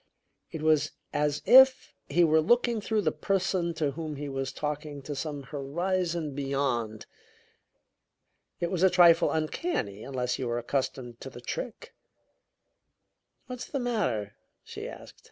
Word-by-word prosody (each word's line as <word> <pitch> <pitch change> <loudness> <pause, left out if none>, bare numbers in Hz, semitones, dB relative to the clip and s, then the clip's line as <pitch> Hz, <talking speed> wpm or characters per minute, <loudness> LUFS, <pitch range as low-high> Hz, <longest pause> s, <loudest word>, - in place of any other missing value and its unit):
It 160 -3 -6
was 155 -1 +3 0.2
as 150 0 0
if 265 0 +7 0.2
he 175 +5 +4
were 160 -1 +4
looking 240 +5 +2
through 215 0 0
the - - +2
person 185 -3 -1
to 150 -3 0
whom 155 +1 -5
he 145 0 -5
was 135 -1 -3
talking 150 -1 -4
to 145 - -5
some 145 0 -4
horizon 165 +3 -2
beyond. 135 -6 -2 1.5
It 170 - -1
was 180 -3 -1
a 190 - +6
trifle 175 -2 +6
uncanny, 155 - -2
unless 125 -2 -2
you 130 - -2
were 120 0 -1
accustomed 120 -1 -3
to 135 - -7
the 120 - -11
trick. 230 - -6 1.5
"What's 250 -1 -6
the 275 - -3
matter?" 170 - -1 0.3
she - - -7
asked. - - -12
155 Hz, 140 wpm, -28 LUFS, 135-180 Hz, 1.5 s, if